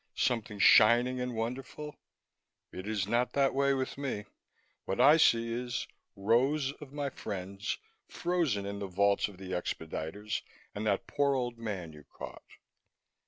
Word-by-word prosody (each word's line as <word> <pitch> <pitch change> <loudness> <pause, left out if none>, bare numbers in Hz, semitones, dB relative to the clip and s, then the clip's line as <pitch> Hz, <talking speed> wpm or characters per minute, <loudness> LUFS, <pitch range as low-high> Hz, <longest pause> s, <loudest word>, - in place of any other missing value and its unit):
Something 115 -3 0
shining 120 +5 +6
and 125 -1 -3
wonderful? 130 +6 -4 0.8
It 95 +2 -7
is 105 -3 0
not 120 +3 +1
that 140 -1 +3
way 140 0 +3
with 130 +1 -3
me; 125 -7 -3 0.6
what 95 - -2
I 150 +3 +8
see 115 -6 +4
is 120 0 -2 0.3
rows 130 +8 +2
of 140 -3 -9
my 145 -1 -3
friends, 100 +1 -4 0.3
frozen 165 - 0
in 100 0 -4
the 100 - -3
vaults 100 +3 +2
or - - -12
the 95 0 -9
expediters 90 +3 -3 0.3
and 105 +1 -3
that 100 -2 +1
poor 140 -1 +1
old 120 -2 -2
man 95 -8 -4
you 75 -1 -13
caught." - - -9
115 Hz, 150 wpm, -31 LUFS, 100-135 Hz, 0.8 s, I